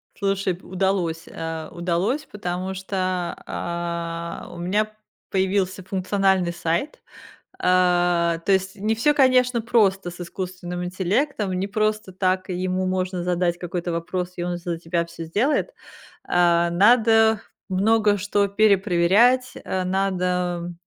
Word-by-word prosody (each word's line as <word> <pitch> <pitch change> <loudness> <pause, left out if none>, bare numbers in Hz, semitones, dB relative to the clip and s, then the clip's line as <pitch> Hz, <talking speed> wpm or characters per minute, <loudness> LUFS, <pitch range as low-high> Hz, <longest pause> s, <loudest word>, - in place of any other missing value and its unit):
Слушай, 195 -2 0
п 180 - -19
удалось, 185 -3 -1
э, 160 -1 -5
удалось, 180 - -1
потому 185 -2 -4
что, 190 +1 -6 0.5
а, 170 -1 -4
у - - -10
меня 205 +5 0 0.4
появился 190 0 0
функциональный 190 -1 +1
сайт. 170 - -2 0.6
А, 175 -2 +2
то - - +2
есть 190 0 0
не 215 +2 -1
всё, 265 +7 +3
конечно, 255 -3 +3
просто 200 -5 +2
с 175 - -11
искусственным 180 0 -5
интеллектом, 200 +5 -1
не 185 +2 -1
просто 215 -1 -1
так 185 0 0
ему 185 +1 -1
можно 185 -1 -1
задать 175 -1 0
какой-то 175 0 -3
вопрос, 180 +2 -3
и 175 - -2
он 175 0 -2
за 175 -1 -4
тебя 170 0 -1
всё 170 0 -9
сделает. 240 - 0 0.5
А, 175 -1 +3
надо 220 +3 +4 0.3
много 205 +2 +3
что 205 +1 +1
перепроверять, 205 +4 +3
э, 185 0 -2
надо 180 -2 -1
185 Hz, 125 wpm, -23 LUFS, 175-205 Hz, 0.6 s, надо